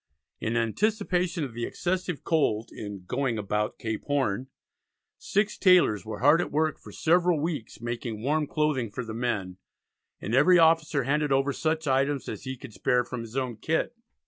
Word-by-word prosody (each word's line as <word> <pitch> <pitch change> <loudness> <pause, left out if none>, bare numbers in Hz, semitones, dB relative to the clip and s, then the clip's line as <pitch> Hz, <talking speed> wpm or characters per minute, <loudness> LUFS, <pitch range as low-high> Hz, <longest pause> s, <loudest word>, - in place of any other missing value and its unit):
In 115 +1 -1
anticipation 180 - 0
of 130 -5 -5
the 120 +1 -4
excessive 180 -3 -2
cold 120 -9 +1
in 100 -3 -7
"going 125 +3 -1
about 105 +1 -2
Cape 110 -1 -4
Horn" 135 -5 0 0.7
six 205 +1 0
tailors 180 - +5
were 110 -1 -5
hard 150 +6 +6
at - - -4
work 155 +1 0
for - - -12
several 175 0 +2
weeks 150 -6 -4
making 120 -2 -4
warm 150 +2 +1
clothing 150 -7 0
for 125 +4 -5
the 110 - -6
men, 110 -6 -2 0.6
and 105 - -4
every 170 +8 +6
officer 160 -4 +4
handed 145 +2 0
over 135 +1 +2
such 160 +2 -1
items 135 0 +1
as - - -6
he 130 0 -4
could 120 -3 -11
spare 125 +3 +1
from 120 0 -6
his 115 +2 -7
own 125 -4 -2
kit. 160 - -1
135 Hz, 170 wpm, -27 LUFS, 115-160 Hz, 0.7 s, hard